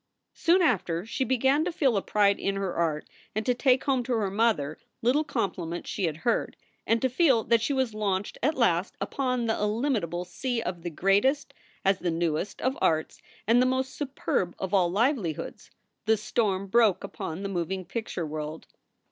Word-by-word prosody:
Soon 355 Hz, +2 st, +3 dB
after 180 Hz, -, +1 dB
she 245 Hz, +4 st, -2 dB
began 265 Hz, +3 st, +2 dB
to 360 Hz, -, -1 dB
feel 275 Hz, -8 st, +2 dB
a 200 Hz, -, +2 dB
pride 200 Hz, -1 st, +2 dB
in 195 Hz, -, -1 dB
her 195 Hz, -2 st, -2 dB
art 160 Hz, -3 st, -1 dB, 0.3 s
and 215 Hz, 0 st, -1 dB
to 250 Hz, -, +3 dB
take 255 Hz, +1 st, +3 dB
home 265 Hz, -2 st, +1 dB
to 245 Hz, +1 st, -2 dB
her 210 Hz, -4 st, 0 dB
mother 195 Hz, -9 st, +1 dB, 0.2 s
little 265 Hz, +6 st, +3 dB
compliments 185 Hz, -, -3 dB
she 195 Hz, -, -1 dB
had 155 Hz, -2 st, -2 dB
heard, 235 Hz, -, 0 dB, 0.3 s
and 230 Hz, -, +3 dB
to -, -, +5 dB
feel 260 Hz, -3 st, +3 dB
that 230 Hz, -1 st, +3 dB
she 240 Hz, -, 0 dB
was 260 Hz, -5 st, 0 dB
launched 205 Hz, -2 st, -2 dB
at 300 Hz, +5 st, +1 dB
last 190 Hz, -7 st, +2 dB
upon 255 Hz, -3 st, -1 dB
the 225 Hz, -, +1 dB
illimitable 210 Hz, -, -1 dB
sea 240 Hz, +7 st, -3 dB
of 180 Hz, -6 st, -4 dB
the 175 Hz, -, -4 dB
greatest, 200 Hz, -, +2 dB, 0.3 s
as 195 Hz, 0 st, +3 dB
the 180 Hz, -, -1 dB
newest, 165 Hz, +3 st, -2 dB
of 260 Hz, +1 st, +1 dB
arts, 160 Hz, -1 st, 0 dB, 0.2 s
and 235 Hz, +3 st, +5 dB
the 255 Hz, -, +4 dB
most 260 Hz, +1 st, -1 dB
superb 265 Hz, -, -2 dB
of 190 Hz, +1 st, -4 dB
all 185 Hz, -3 st, +4 dB
livelihoods, 205 Hz, -, -1 dB, 0.4 s
the 220 Hz, 0 st, +4 dB
storm 200 Hz, -3 st, 0 dB
broke 215 Hz, -1 st, +3 dB
upon 165 Hz, +5 st, -5 dB
the -, -, -1 dB
moving 185 Hz, 0 st, -3 dB
picture 200 Hz, -4 st, -4 dB
world. 155 Hz, +1 st, -5 dB
215 Hz, 185 wpm, -27 LUFS, 180-255 Hz, 0.4 s, to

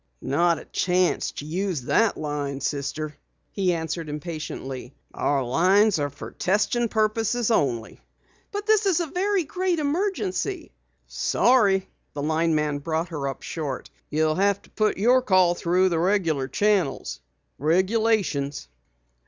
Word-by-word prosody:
"Not 165 Hz, +5 st, +2 dB
a -, -, -10 dB
chance 180 Hz, 0 st, +1 dB
to 145 Hz, -, -7 dB
use 175 Hz, -2 st, -2 dB
that 225 Hz, -, +2 dB
line, 145 Hz, -2 st, -3 dB
Sister," 145 Hz, +2 st, -3 dB, 0.4 s
he 190 Hz, -3 st, +1 dB
answered 160 Hz, -1 st, -3 dB
impatiently. 150 Hz, -4 st, -6 dB, 0.2 s
"Our 140 Hz, -1 st, 0 dB
'phones 185 Hz, -, +3 dB
are 145 Hz, 0 st, 0 dB
for 140 Hz, -, -9 dB
testing 210 Hz, +5 st, +1 dB
purposes 225 Hz, +2 st, +1 dB
only." 125 Hz, -, 0 dB, 0.5 s
"But 410 Hz, -1 st, -4 dB
this 435 Hz, -1 st, +3 dB
is 365 Hz, -4 st, +3 dB
a 340 Hz, -, 0 dB
very 380 Hz, +4 st, 0 dB
great 360 Hz, +3 st, -1 dB
emergency 370 Hz, +3 st, -2 dB, 0.3 s
" -, -, -45 dB, 0.3 s
"Sorry," 200 Hz, -7 st, +4 dB, 0.3 s
the 145 Hz, -, -4 dB
lineman 155 Hz, -2 st, +1 dB
brought 160 Hz, +3 st, -2 dB
her 145 Hz, -5 st, -3 dB
up 135 Hz, -1 st, -5 dB
short. 145 Hz, -6 st, -5 dB, 0.2 s
"You'll 155 Hz, +1 st, +1 dB
have 200 Hz, +3 st, +2 dB
to -, -, -21 dB
put 215 Hz, -1 st, 0 dB
your 245 Hz, +6 st, +4 dB
call 185 Hz, -6 st, +4 dB
through 180 Hz, +2 st, +2 dB
the 170 Hz, -2 st, 0 dB
regular 165 Hz, -7 st, +1 dB
channels. 195 Hz, -, 0 dB, 0.4 s
Regulations." 180 Hz, -, +1 dB
180 Hz, 135 wpm, -25 LUFS, 150-220 Hz, 0.5 s, Sorry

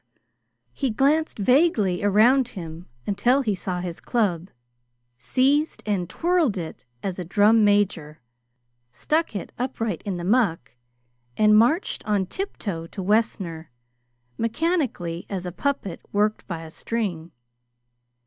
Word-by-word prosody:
He 270 Hz, -, -1 dB
glanced 285 Hz, +7 st, +1 dB
vaguely 215 Hz, -, +3 dB
around 230 Hz, +6 st, +4 dB
him 170 Hz, -5 st, -8 dB, 0.2 s
until 245 Hz, +7 st, +2 dB
he 215 Hz, -4 st, +1 dB
saw 180 Hz, -1 st, -3 dB
his 175 Hz, -2 st, -5 dB
club, 190 Hz, -7 st, -1 dB, 0.7 s
seized 280 Hz, -, +1 dB
and 190 Hz, -5 st, -1 dB
twirled 335 Hz, -, +1 dB
it 165 Hz, -6 st, -7 dB, 0.2 s
as 190 Hz, -1 st, -3 dB
a -, -, -2 dB
drum 210 Hz, +5 st, +4 dB
major, 200 Hz, -7 st, +1 dB, 0.7 s
stuck 310 Hz, -, -1 dB
it 200 Hz, -, -5 dB
upright 230 Hz, -7 st, -2 dB
in 195 Hz, -3 st, -4 dB
the 175 Hz, -, -5 dB
muck, 185 Hz, -, +1 dB, 0.6 s
and 215 Hz, 0 st, +5 dB
marched 245 Hz, -, +2 dB
on 205 Hz, -3 st, +1 dB
tiptoe 195 Hz, -, -5 dB
to 190 Hz, +2 st, -7 dB
Wessner, 190 Hz, -6 st, 0 dB, 0.7 s
mechanically, 230 Hz, -, -1 dB
as 185 Hz, -2 st, -4 dB
a 180 Hz, -, -4 dB
puppet 200 Hz, -5 st, -3 dB
worked 210 Hz, +1 st, 0 dB
by 165 Hz, -3 st, -5 dB
a 160 Hz, -, -10 dB
string. 180 Hz, -6 st, -3 dB
205 Hz, 125 wpm, -24 LUFS, 180-250 Hz, 0.7 s, and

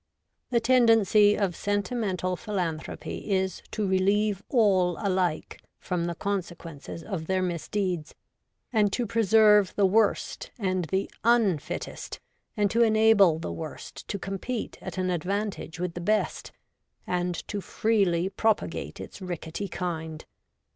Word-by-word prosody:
The 240 Hz, -, +3 dB
tendency 225 Hz, -4 st, +5 dB
of 190 Hz, -4 st, 0 dB
sentimental 205 Hz, -3 st, -1 dB
philanthropy 180 Hz, -1 st, -4 dB
is 190 Hz, -2 st, 0 dB
to 210 Hz, -2 st, -2 dB
relieve 195 Hz, +2 st, +2 dB
all 190 Hz, -8 st, +3 dB
alike 185 Hz, -5 st, -1 dB, 0.2 s
from 175 Hz, -2 st, -2 dB
the 170 Hz, 0 st, -3 dB
consequences 170 Hz, -5 st, -5 dB
of 170 Hz, -6 st, -5 dB
their 185 Hz, 0 st, +1 dB
misdeeds, 180 Hz, -1 st, -2 dB, 0.6 s
and 210 Hz, -3 st, +3 dB
to 245 Hz, -, 0 dB
preserve 210 Hz, -2 st, +4 dB
the 200 Hz, -, +3 dB
worst 210 Hz, +2 st, +1 dB
and 185 Hz, -5 st, -1 dB
the 190 Hz, +5 st, -1 dB, 0.2 s
nn 220 Hz, -9 st, +3 dB
fittest, -, -, -6 dB, 0.4 s
and 205 Hz, -1 st, +2 dB
to 235 Hz, -, +2 dB
enable 220 Hz, -6 st, +5 dB
the 165 Hz, -, -5 dB
worst 160 Hz, -2 st, -8 dB
to 200 Hz, -, -3 dB
compete 195 Hz, +5 st, -4 dB
at -, -, -7 dB
an 185 Hz, -1 st, 0 dB
advantage 180 Hz, -1 st, -3 dB
with 180 Hz, -1 st, -2 dB
the 175 Hz, -, -6 dB
best, 215 Hz, +4 st, 0 dB, 0.5 s
and 180 Hz, 0 st, -1 dB
to 205 Hz, -, -3 dB
freely 195 Hz, -6 st, +1 dB
propagate 220 Hz, +2 st, -1 dB
its -, -, -9 dB
rickety 175 Hz, +1 st, -5 dB
kind. 160 Hz, -4 st, -5 dB
195 Hz, 130 wpm, -27 LUFS, 175-210 Hz, 0.6 s, tendency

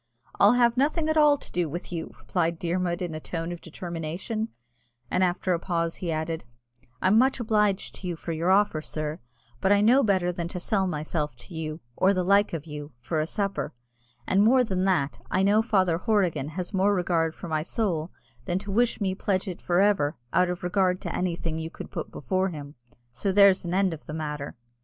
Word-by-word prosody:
"I'll 205 Hz, +3 st, +7 dB
have 240 Hz, -1 st, +3 dB
nothing 310 Hz, +4 st, +1 dB
at 315 Hz, -, +1 dB
all 300 Hz, -2 st, +6 dB
to -, -, -10 dB
do 175 Hz, -3 st, 0 dB
with 175 Hz, +5 st, -6 dB
you," 165 Hz, -2 st, -4 dB
replied 170 Hz, -2 st, -1 dB
Dermod 175 Hz, +1 st, -1 dB
in 175 Hz, -2 st, -4 dB
a 155 Hz, -, -4 dB
tone 165 Hz, +1 st, -4 dB
of 175 Hz, -, -7 dB
determination; 170 Hz, +6 st, -4 dB, 0.6 s
and 185 Hz, -, +2 dB
after 180 Hz, 0 st, +1 dB
a 170 Hz, -, 0 dB
pause 170 Hz, -2 st, -1 dB
he 175 Hz, -3 st, -3 dB
added, 160 Hz, +1 st, -2 dB, 0.6 s
"I'm 195 Hz, +4 st, +5 dB
much 265 Hz, +1 st, +3 dB
obliged 210 Hz, -4 st, +1 dB
to 185 Hz, -, -6 dB
you 175 Hz, -, -2 dB
for 165 Hz, -, -6 dB
your 165 Hz, +2 st, 0 dB
offer, 195 Hz, -5 st, +3 dB
sir, 155 Hz, 0 st, -4 dB, 0.4 s
but 190 Hz, -, +2 dB
I 205 Hz, -, +6 dB
know 245 Hz, +6 st, +6 dB
better 190 Hz, -6 st, +2 dB
than 170 Hz, -1 st, -4 dB
to 180 Hz, -, -5 dB
sell 190 Hz, +1 st, +1 dB
myself 150 Hz, -3 st, -2 dB
to 120 Hz, +9 st, -11 dB
you, 160 Hz, 0 st, -4 dB
or 195 Hz, +1 st, +3 dB
the 185 Hz, -, +1 dB
like 200 Hz, +3 st, +4 dB
of 165 Hz, -2 st, -4 dB
you, 150 Hz, -2 st, -8 dB
for 155 Hz, +7 st, -2 dB
a 155 Hz, -, 0 dB
supper; 200 Hz, -, -2 dB, 0.5 s
and 195 Hz, -, +3 dB
more 250 Hz, +4 st, +5 dB
than 190 Hz, -5 st, -1 dB
that, 170 Hz, -8 st, +1 dB
I 190 Hz, -, +2 dB
know 205 Hz, +2 st, +4 dB
Father 185 Hz, -7 st, +2 dB
Horrigan 190 Hz, -, +1 dB
has 180 Hz, +2 st, -4 dB
more 195 Hz, +2 st, +3 dB
regard 170 Hz, -3 st, +1 dB
for -, -, -8 dB
my 155 Hz, -1 st, 0 dB
soul 175 Hz, -3 st, -1 dB, 0.4 s
than 175 Hz, -2 st, 0 dB
to 200 Hz, +1 st, -5 dB
wish 235 Hz, +4 st, +2 dB
me 190 Hz, -2 st, +1 dB
to 190 Hz, -, -13 dB
pledge 190 Hz, -1 st, +1 dB
it 180 Hz, -, -5 dB
for 175 Hz, +1 st, +2 dB
ever, 185 Hz, -7 st, +2 dB, 0.2 s
out 180 Hz, 0 st, +3 dB
of 180 Hz, 0 st, -4 dB
regard 185 Hz, 0 st, +1 dB
to -, -, -4 dB
anything 170 Hz, -3 st, -2 dB
you 160 Hz, 0 st, -4 dB
could -, -, -9 dB
put -, -, -4 dB
before 185 Hz, +8 st, -1 dB
him 145 Hz, -4 st, -8 dB, 0.4 s
so 190 Hz, +11 st, -1 dB
there's 195 Hz, -1 st, +5 dB
an 175 Hz, +1 st, -2 dB
end 190 Hz, -2 st, +2 dB
of 155 Hz, -, -10 dB
the 155 Hz, -, -5 dB
matter." 150 Hz, -2 st, -4 dB
180 Hz, 215 wpm, -26 LUFS, 165-200 Hz, 0.6 s, I'll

